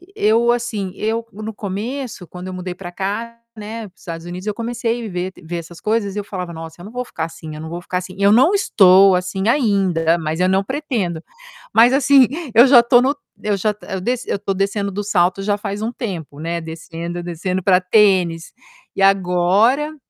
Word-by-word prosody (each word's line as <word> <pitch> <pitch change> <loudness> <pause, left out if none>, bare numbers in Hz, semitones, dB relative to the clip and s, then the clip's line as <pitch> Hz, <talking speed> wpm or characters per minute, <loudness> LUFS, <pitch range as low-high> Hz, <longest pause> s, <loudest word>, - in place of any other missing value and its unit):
eu 230 - +3
assim, 225 -6 -2
eu 225 +2 -2
no 215 +2 -7
começo 215 +1 -5
quando 180 +3 -9
eu 185 - -6
mudei 180 0 -5
para 175 -1 -8
cá, 225 +5 -4 0.2
né, 220 +2 -6
para 185 - -21
os - - -25
Estados 165 0 -7
Unidos 180 +2 -7
eu 210 - 0
comecei 235 0 -3
ver 180 0 -3
ver 170 +2 -6
essas 170 0 -9
coisas 210 -2 -1
e 210 - -1
eu - - -4
falava: 180 -4 -5
"Nossa 165 +1 -9
eu 180 - -10
não 215 - -10
vou 250 0 -4
ficar 160 - -5
assim, 160 -2 -9
eu 155 - -8
não 160 - -7
vou 175 +1 -6
ficar 180 +1 -2
assim". 185 0 -9
Eu 200 0 +5
não 270 - +5
estou 195 - +6
assim 190 +3 -2
ainda, 195 - +2
mas 160 +2 -2
eu 185 - +3
não 190 +1 +3
pretendo. 225 - -3 0.5
Mas 230 +4 +6
assim, 275 -2 +5 0.3
eu 235 +4 +7
já 255 -2 +8
estou 240 +1 +4
no 270 +3 +1 0.3
eu 210 -1 0
já 210 +2 0
to 210 - -17
eu 190 -1 -4
desci 245 +5 -2
eu - - +1
estou 195 0 -2
descendo 200 +1 -1
do 205 +2 -4
salto 185 -1 +1
já 205 +1 0
faz 205 0 -5
um 225 +2 -2
tempo, 170 - -6
né, 170 +1 -2
descendo, 165 +1 -6
descendo 175 +2 -3
para 185 -2 +4
tênis. 180 -4 +2 0.4
E - - -2
agora, 195 - +3
195 Hz, 210 wpm, -19 LUFS, 175-230 Hz, 0.5 s, já